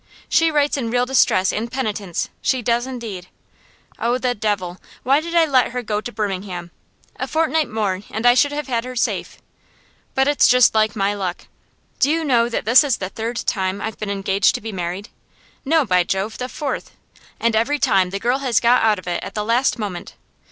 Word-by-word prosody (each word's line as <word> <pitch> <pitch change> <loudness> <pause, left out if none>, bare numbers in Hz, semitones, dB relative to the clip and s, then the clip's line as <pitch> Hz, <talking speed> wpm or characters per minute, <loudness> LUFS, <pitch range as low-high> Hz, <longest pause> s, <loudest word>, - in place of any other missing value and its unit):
She 330 0 +3
writes 295 -2 +1
in 235 -4 -2
real 245 +1 +1
distress 245 -7 +3
and 230 +2 -3
penitence 210 -8 -3
she 255 -2 0
does 240 +2 +1
indeed. 225 -8 -7 0.7
Oh, 240 +2 +1
the 255 -1 0
devil! 200 -5 -3 0.2
Why 275 +4 +3
did 335 +1 -5
I 335 -1 +5
let 260 -5 +2
her 250 -1 -3
go 210 -1 -2
to 240 - -6
Birmingham? 190 -5 -4 0.5
A - - -3
fortnight 315 -1 +1
more, 205 -4 -1
and 220 +3 -4
I 245 - +7
should 285 +3 +3
have 295 0 -3
had 235 -3 -1
her 255 0 -7
safe. 235 - -2 0.8
But 265 +1 +3
it's 290 0 +4
just 250 -1 +5
like 215 -1 +2
my 200 0 +1
luck. 190 -3 -4 0.5
Do 280 - +3
you 325 +1 +1
know 240 -4 +3
that 235 - -3
this 235 +7 +7
is 275 -5 0
the 185 - -4
third 225 +4 -4
time 190 -1 -1
I've 220 +1 -5
been 210 - -4
engaged 195 0 +1
to - - -4
be 220 +1 -5
married? 180 +1 -5 0.5
no, 315 0 +2
by 180 -4 +3
Jove, 195 +4 -3
the 250 0 -4
fourth! 285 0 -5 0.4
And 230 -1 +1
every 245 +7 +1
time 195 -10 +2
the 195 - -3
girl 245 +6 0
has 255 -5 +2
got 245 +1 +4
out 220 -2 +3
of 185 - -10
it 175 - -2
at - - -8
the 210 -1 -2
last 240 +5 +2
moment. 200 -6 -6
230 Hz, 210 wpm, -20 LUFS, 200-260 Hz, 0.8 s, I